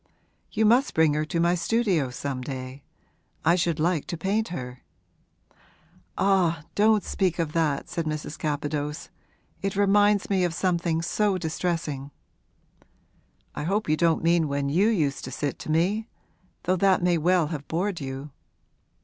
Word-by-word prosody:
'You 220 0 +1
must 245 +6 +3
bring 160 -2 +4
her 150 +1 0
to 165 +2 -2
my 170 +1 +3
studio 180 - +1
some 130 +1 -4
day 130 +1 -6 0.6
I 165 - +5
should 175 -3 0
like 165 -1 0
to 170 - -4
paint 205 +6 0
her.' 125 -6 -7 1.4
'Ah, 180 -5 +2
don't 215 0 +3
speak 185 -3 0
of 165 -3 -2
that,' 155 -4 0
said 170 - -3
Mrs. 155 0 -4
Capadose. 150 0 -3 0.5
'It 195 0 -2
reminds 205 0 +3
me 190 -2 +1
of 175 -2 0
something 170 -3 0
so 205 +2 +1
distressing.' 160 -4 -3 1.4
'I - - -4
hope 200 +5 0
you 155 - +3
don't 165 0 +2
mean 170 -1 +3
when 140 0 -1
you 185 +9 +3
used 155 -11 0
to 130 - -7
sit 145 -1 -3
to - - -8
me 195 +8 +1 0.6
though 185 +1 +1
that 190 -1 +3
may 175 -2 +3
well 175 -1 +2
have 150 -4 -6
bored 180 +1 -2
you.' 135 +2 -6
170 Hz, 155 wpm, -26 LUFS, 150-190 Hz, 1.4 s, I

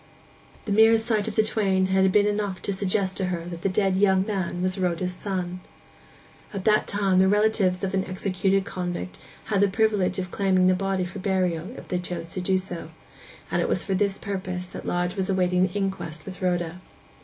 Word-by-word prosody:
The 210 - -3
mere 220 +2 +6
sight 220 -2 0
of - - -4
the 220 - +4
twain 195 -3 +1
had 190 0 +3
been 205 +1 +4
enough 205 -2 -1
to 200 - -1
suggest 190 0 0
to 190 - 0
her 175 -2 -3
that 170 -1 -7
the 195 - +1
dead 190 0 +1
young 190 -1 +3
man 185 -4 -2
was 185 +1 -1
Rhoda's 180 0 -1
son. 180 -1 -4 1.0
At 190 - -4
that 215 0 +3
time 195 -2 +2
the 190 - +5
relatives 205 -3 +2
of 190 0 -1
an 190 -1 +1
executed 190 +1 0
convict 175 - -5 0.3
had 205 -3 +1
the 205 - +5
privilege 200 -2 +1
of 185 -1 -4
claiming 190 -3 +2
the 185 - +5
body 190 0 -1
for 180 +3 -7
burial, 185 -3 0
if - - -10
they 180 - 0
chose 170 -2 -5
to 185 - -3
do 190 +1 +2
so; 185 -2 -6 0.6
and - - +1
it - - 0
was - - 0
for 195 - -2
this 195 0 +1
purpose 185 -3 -4
that - - -8
Lodge 175 +1 -1
was 190 -1 -1
awaiting 180 -1 +2
the 180 - -11
inquest 190 -6 -3
with 190 -1 -9
Rhoda. 175 -1 -1
190 Hz, 205 wpm, -25 LUFS, 180-200 Hz, 1.0 s, mere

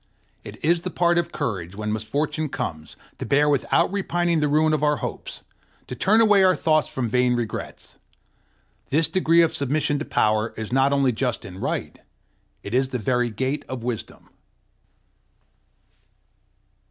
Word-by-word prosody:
It - - -10
is 170 +1 +3
the 185 - -4
part 175 -1 +2
of 170 - -3
courage, 95 -5 -4
when 105 +1 -3
misfortune 150 +8 -2
comes, 80 - -5 0.2
to - - -4
bear 145 +1 +3
without 145 +4 +2
repining 175 -4 0
the 150 - +1
ruin 155 +2 +2
of 155 - 0
our 150 0 +2
hopes, - - -7 0.4
to - - -7
turn 210 - +3
away 205 -3 +5
our 185 -1 +5
thoughts 155 -2 +2
from 130 -2 -2
vain 125 +2 +2
regrets. 120 -3 -6 0.9
This 155 +3 +3
degree 170 -2 +3
of 165 - 0
submission 145 +1 0
to 155 - -4
Power 110 +1 0
is 110 +1 -5
not 135 +1 +3
only 140 -2 +2
just 125 +1 -2
and 95 0 -9
right: - - -3 0.6
it 100 - -7
is 130 +1 +2
the 130 - -2
very 125 +2 0
gate 130 +6 -2
of 130 -3 -5
wisdom. 120 -3 -6
140 Hz, 160 wpm, -23 LUFS, 120-160 Hz, 0.9 s, away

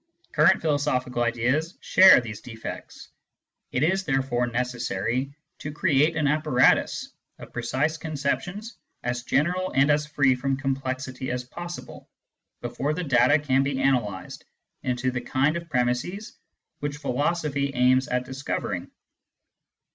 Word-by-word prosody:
Current 165 +5 +4
philosophical 130 -5 0
ideas 125 +8 0
share 190 -4 +7
these 110 -3 -7
defects; 115 -2 -9 0.6
it 125 - 0
is 190 +4 +2
therefore 135 -5 0
necessary 125 +1 -2 0.3
to 150 - -5
create 150 0 +2
an 150 -2 0
apparatus 150 -4 +2 0.3
of - - -12
precise 130 +7 -1
conceptions 165 +8 -3 0.3
as 120 0 -2
general 180 +9 0
and 140 +2 +4
as 150 +1 +1
free 140 -3 +3
from 135 +1 -1
com 135 -1 -1
plexity 130 -1 -4
as 125 0 -2
possible, 175 +7 -9 0.5
before 145 +3 -2
the 180 - -3
data 145 0 +4
can 135 -3 +1
be 135 -1 -1
analysed 125 -8 -1 0.4
into 125 0 -1
the 125 -1 -3
kind 140 +5 +1
of 170 0 -6
premisses 125 - -1 0.4
which 145 0 -3
philosophy 145 0 -1
aims 130 +1 +3
at 125 0 -1
discover 135 +2 -3
ing. - - -5
135 Hz, 130 wpm, -25 LUFS, 125-150 Hz, 0.6 s, share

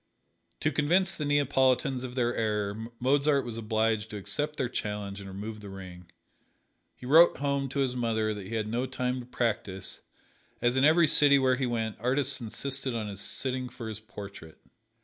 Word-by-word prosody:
To 155 - +2
convince 175 +7 +2
the 150 - -4
Neapolitans 135 -2 +2
of 125 -1 -6
their 120 -2 +1
error 105 0 -1
Mozart 140 +2 +2
was 120 -2 -5
obliged 110 -1 0
to 105 - -6
accept 150 +9 -3
their 130 - 0
challenge 105 -4 -4
and 100 - -9
remove 105 +3 -6
the 100 -1 -9
ring. 90 -2 -10 0.9
He - - -12
wrote 160 +6 +6
home 140 -1 -1
to 140 +1 -1
his 130 -2 0
mother 110 -3 0
that 100 -3 -7
he 115 - -4
had 110 -1 -1
no 120 +4 -1
time 125 0 -2
to 120 - -9
practise, 105 -6 -2 0.6
as 120 +1 +1
in 130 - +3
every 160 +2 +6
city 145 -1 +6
where 130 -1 +3
he 130 -1 0
went 115 -3 -2
artists 135 +3 +1
insisted 130 +3 -2
on 110 -2 -3
his 100 0 -5
sitting 130 +1 -2
for 120 -2 -8
his 110 -1 -6
portrait. 100 -6 -10
120 Hz, 185 wpm, -29 LUFS, 105-135 Hz, 0.9 s, wrote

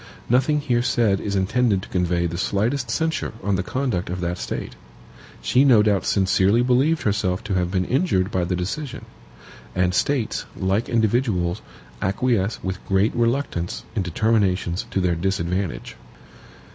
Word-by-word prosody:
Nothing 135 +4 +3
here 120 -4 +1
said 115 -5 +2
is 100 -1 -3
intended 100 +1 +1
to - - -10
convey 90 -1 0
the 85 0 -3
slightest 115 +7 0
censure 160 +7 -1
on 100 0 +1
the 90 - 0
conduct 115 -5 -2
of 90 +1 -3
that 90 0 -2
State. - - -4 0.7
She 130 - +4
no 120 -7 +6
doubt 100 -3 +1
sincerely 100 +3 +3
believed 135 +6 +2
herself 100 -1 0
to 105 -3 -3
have 90 -2 +1
been 90 0 0
injured 110 - +1
by 90 -2 0
the 90 +1 -1
decision; 125 +11 -4 0.7
and 90 0 +2
States, 125 +3 0
like 95 +4 0
individuals, 110 -5 +1 0.4
acquiesce 105 +1 0
with 95 0 -4
great 95 +2 +2
reluctance 120 -7 -1
in 105 - +1
determinations 95 -1 0
to 95 - -1
their 90 -1 +2
disadvantage. 90 +1 -2
100 Hz, 150 wpm, -23 LUFS, 90-120 Hz, 0.7 s, no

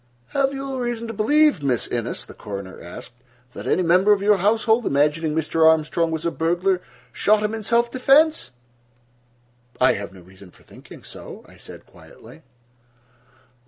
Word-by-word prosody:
"Have 275 -1 0
you 270 -1 -5
reason 240 -1 -3
to - - -5
believe, 290 - +3
Miss 130 -4 0
Innes," 120 -1 -4
the - - -13
coroner 100 -3 -8
asked, 85 +8 -11 0.4
"that - - -8
any 185 - +1
member 180 +4 +4
of 200 -1 +2
your 210 0 +4
household, 220 +4 +1
imagining 150 +2 +1
Mr. 160 0 0
Armstrong 160 +1 +2
was 160 0 -4
a 170 - 0
burglar, 175 +3 0 0.3
shot 210 0 +2
him 210 +1 -1
in 225 - -4
self 235 +2 +1
defense?" 275 - +3 1.3
"I 130 - +5
have 100 0 -6
no 95 -1 -15
reason 95 +1 -16
for - - -22
thinking - - -15
so," - - -11
I - - -18
said - - -12
quietly. - - -17
185 Hz, 160 wpm, -22 LUFS, 150-230 Hz, 1.3 s, I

